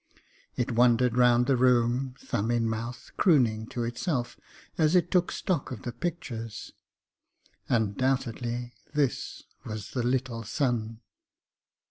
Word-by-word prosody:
It 125 - -1
wandered 120 0 +4
round 125 -1 +5
the 135 - +3
room, 125 +1 +2
thumb 110 -1 -2
in 120 -1 +1
mouth, 115 +2 -5
crooning 115 - +3
to 120 - -3
itself 120 +2 -2 0.4
as 160 +1 +3
it 175 -3 +3
took 180 -1 +2
stock 175 -7 -1
of 125 -5 -7
the 120 - -3
pictures. 120 -6 -5 1.0
Undoubtedly 120 +1 0 0.2
this 145 -4 -1 0.2
was 110 -2 -6
the 125 - -1
'little 125 -1 -1
son.' 115 -1 -1
120 Hz, 120 wpm, -28 LUFS, 115-130 Hz, 1.0 s, round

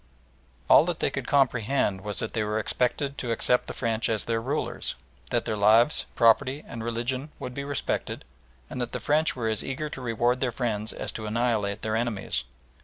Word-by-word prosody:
All - - +8
that - - -2
they - - +1
could - - -4
comprehend 125 -6 +2
was 105 -1 -4
that 115 - -2
they 110 - 0
were 105 0 -1
expected 135 +5 0
to 120 - -2
accept 125 +2 +2
the - - -5
French 115 -2 0
as 110 -2 +1
their 115 -1 0
rulers; 140 +6 -2 0.3
that - - 0
their 110 - -1
lives, 110 +7 +4
property, 130 +5 +4
and 115 -1 -6
religion 120 +5 -2
would 125 -3 -6
be 140 - -4
respected; 140 0 -3 0.4
and 125 - -5
that 120 - -3
the - - -2
French 155 +2 +2
were 120 -3 -2
as 110 -2 0
eager 140 +3 -3
to 135 - -7
reward 120 +1 +1
their 130 -2 +1
friends 110 -3 -1
as - - -5
to 110 -1 -6
annihilate 110 -3 0
their 110 0 0
enemies. 110 - -1
120 Hz, 195 wpm, -27 LUFS, 110-130 Hz, 0.4 s, All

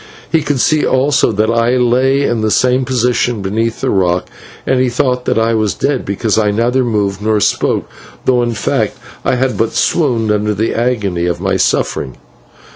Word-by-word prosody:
He 165 -1 +2
could 145 -3 -1
see 155 +4 +2
also 130 -1 +2
that 110 +1 +1
I 115 +2 +2
lay 130 +3 +2
in 120 -4 0
the 110 - +1
same 125 +3 +2
position 125 -3 0
beneath 115 +4 -2
the - - 0
rock, 90 -2 +1 0.4
and 130 -1 +1
he 130 -1 +2
thought 125 +1 -1
that - - 0
I 115 +1 +2
was 110 -2 0
dead, 140 -2 -1
because 105 +2 0
I 105 -1 +2
neither 120 +5 +1
moved 105 -4 -1
nor 110 0 +1
spoke, - - 0 0.4
though, 125 -1 +3
in 120 -1 -1
fact, 100 - -1 0.3
I - - +1
had 130 0 -1
but 115 - 0
swooned 120 -9 +1
under 105 0 0
the 110 +3 -1
agony 105 -8 -1
of 85 -1 -2
my 95 +1 -1
suffering. 70 -7 -1
115 Hz, 190 wpm, -14 LUFS, 105-125 Hz, 0.4 s, though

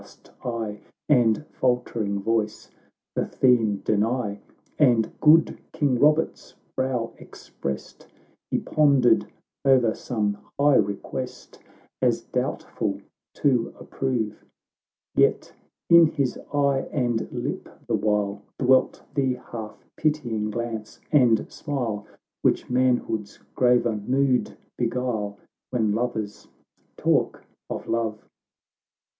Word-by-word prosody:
st - - -19
eye, 115 -3 -3 0.3
And 120 -1 +3
faltering 115 -5 -1
voice, 110 -1 -1 0.4
the - - 0
theme 115 -6 +2
deny. 110 0 0 0.4
And 120 -7 +4
good 155 +1 +5
King 135 -5 +1
Robert's 150 +3 +2 0.2
brow 130 -3 -1
expressed, 70 - -7 0.4
He - - +1
pondered 140 -6 +3 0.4
o'er 130 -5 +4
some 105 -4 -2 0.2
high 145 -1 +5
request, 100 -1 -3 0.4
As - - +2
doubtful - - -2 0.4
to 125 -5 +1
approve; 120 -6 -3 0.7
Yet - - +2 0.3
in 170 -1 +8
his 140 -5 -1 0.2
eye 140 -2 +1
and 120 -5 -1
lip - - -4 0.2
the - - -2
while 105 -1 0 0.2
Dwelt 130 0 +3
the 135 -3 +1 0.2
half 110 -2 -7
pitying 120 -9 0
glance 110 -1 -5
and 125 -7 +4
smile, 120 -9 -3 0.3
Which - - +1
manhood's 125 -5 +1 0.2
graver 125 -2 +3
mood 130 +4 +1 0.2
beguile, 115 -4 -1 0.3
When 110 -4 +1
lovers 110 -2 -3 0.5
talk - - +1 0.2
of - - -5
love. 110 -2 -2
120 Hz, 100 wpm, -25 LUFS, 110-130 Hz, 0.7 s, in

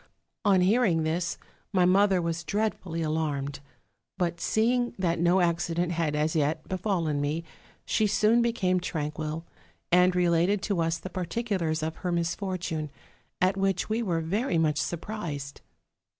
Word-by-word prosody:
On 195 -3 +4
hearing 190 -4 +3
this, 165 +2 -1 0.3
my 185 -3 +3
mother 190 0 +4
was 170 0 -2
dreadfully 190 -4 -2
alarmed; 150 -3 -2 0.6
but 175 -2 -1
seeing 240 +2 +1
that 170 -3 0
no 175 +2 +4
accident 170 0 0
had 165 -3 0
as 155 +2 0
yet 155 +1 0
befallen 180 -6 -1
me, 150 +3 -1 0.4
she 215 - +2
soon 215 +3 +3
became 195 -6 +1
tranquil, 155 -1 -4 0.5
and 180 +1 +5
related 180 +3 +2
to 195 -5 0
us 165 0 0
the 185 +3 -8
particulars 180 -4 -2
of 160 0 -3
her 180 - -3
misfortune: 170 -2 -2 0.5
at 185 +1 +3
which 195 0 0
we 220 +2 0
were 175 -7 0
very 190 +4 0
much 155 -2 +2
surprised. 155 -3 -4
175 Hz, 140 wpm, -28 LUFS, 160-195 Hz, 0.6 s, and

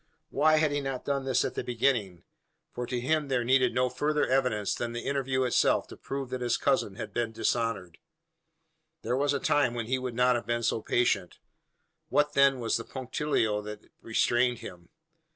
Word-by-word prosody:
Why 155 +2 +4
had 155 -1 +2
he 145 0 -1
not 135 -2 -4
done 140 -1 -1
this 130 -2 +1
at - - -3
the - - -3
beginning 115 -8 0 0.5
for 125 0 -4
to 125 - -2
him 150 +4 0
there 130 -3 0
needed 130 +1 +3
no 125 +1 +3
further 150 +4 0
evidence, 125 -6 +1
than 120 -1 -4
the 120 - -5
interview 135 -1 0
itself, 125 - +2
to - - -9
prove 135 -2 -6
that 130 -1 -3
his 120 -1 +1
cousin 175 - 0
had 110 -2 -7
been 120 0 -1
dishonoured? 110 -7 -2 1.0
There 125 - 0
was 140 +2 +1
a 140 - 0
time 145 -5 +2
when 115 -1 -3
he 130 +3 -1
would 125 -2 -5
not 125 0 +3
have 120 - -4
been 120 0 -1
so 110 - 0
patient. 100 -8 0 0.7
What, 150 0 +2
then, 140 -1 +4
was 115 -2 0
the 115 - -5
punctilio 125 -4 -1
that 105 0 -10
restrained 120 +2 +1
him? 85 -4 -11
125 Hz, 190 wpm, -28 LUFS, 115-135 Hz, 1.0 s, Why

